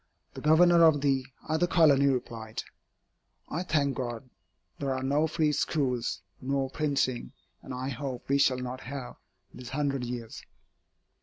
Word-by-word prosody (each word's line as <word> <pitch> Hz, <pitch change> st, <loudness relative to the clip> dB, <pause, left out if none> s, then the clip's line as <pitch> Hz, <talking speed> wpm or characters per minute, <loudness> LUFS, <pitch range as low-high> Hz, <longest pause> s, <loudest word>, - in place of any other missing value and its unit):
The -, -, -8 dB
Governor 170 Hz, +2 st, +6 dB
of 155 Hz, -3 st, +5 dB
the 135 Hz, -2 st, +1 dB, 0.2 s
other 160 Hz, +3 st, +1 dB
colony 145 Hz, -6 st, +5 dB
replied, 115 Hz, -4 st, -2 dB, 0.9 s
"I 165 Hz, -, -2 dB
thank 145 Hz, -6 st, +1 dB
God, 125 Hz, 0 st, -5 dB, 0.5 s
there 135 Hz, -2 st, -1 dB
are 130 Hz, -, -3 dB
no 145 Hz, +4 st, +2 dB
free 155 Hz, -1 st, +1 dB
schools, 130 Hz, -4 st, -1 dB, 0.2 s
nor 135 Hz, 0 st, -1 dB
printing, 140 Hz, -5 st, -1 dB, 0.3 s
and -, -, -10 dB
I 130 Hz, +1 st, -3 dB
hope 130 Hz, -1 st, -5 dB
we 140 Hz, +1 st, +2 dB
shall 135 Hz, -2 st, +4 dB
not 125 Hz, 0 st, -5 dB
have, 130 Hz, -1 st, -7 dB, 0.4 s
these 125 Hz, -1 st, -9 dB
hundred 140 Hz, -1 st, -1 dB
years." 120 Hz, -2 st, -6 dB
135 Hz, 145 wpm, -29 LUFS, 125-150 Hz, 0.9 s, Governor